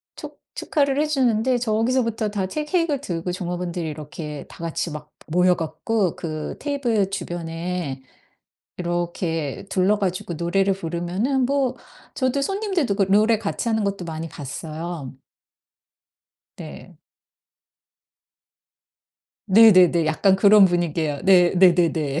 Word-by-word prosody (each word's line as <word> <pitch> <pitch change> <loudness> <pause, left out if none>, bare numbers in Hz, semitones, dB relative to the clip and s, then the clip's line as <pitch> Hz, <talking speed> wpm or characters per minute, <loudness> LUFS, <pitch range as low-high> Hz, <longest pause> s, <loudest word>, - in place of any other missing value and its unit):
축 - - -10 0.2
축하를 280 -1 0
해 - - +2
주는데 250 -3 +1
저기서부터 230 -1 0
다 200 -2 -2
채 300 +10 -4
케익을 325 -3 0
들고 175 -6 -4
종업원들이 175 -1 -4
이렇게 150 0 -7
다 - - -14
같이 165 0 -3
막 150 0 -9 0.2
모여 180 +2 +3
갖고 175 +4 -1
그 155 -2 -5
테이블 245 -9 0
주변에 170 -5 -4 0.8
이렇게 175 -1 -3
둘러 195 +3 +2
가지고 185 -3 -2
노래를 190 +4 +1
부르면은 185 - -1
뭐 270 -1 0 0.4
저도 260 +1 0
손님들도 380 - -1
그 200 - +2
노래 215 +2 +4
같이 220 +2 -3
하는 220 -1 0
것도 200 -3 -3
많이 165 0 -5
봤어요. 155 +1 -7 1.4
네. - - -10 2.5
네네네 185 -6 +6
약간 190 +5 +3
그런 205 +1 +7
분위기예요. 165 -5 0
네 180 -2 +6
네네네. 165 -5 +3
185 Hz, 260 characters per minute, -22 LUFS, 165-225 Hz, 2.5 s, 그런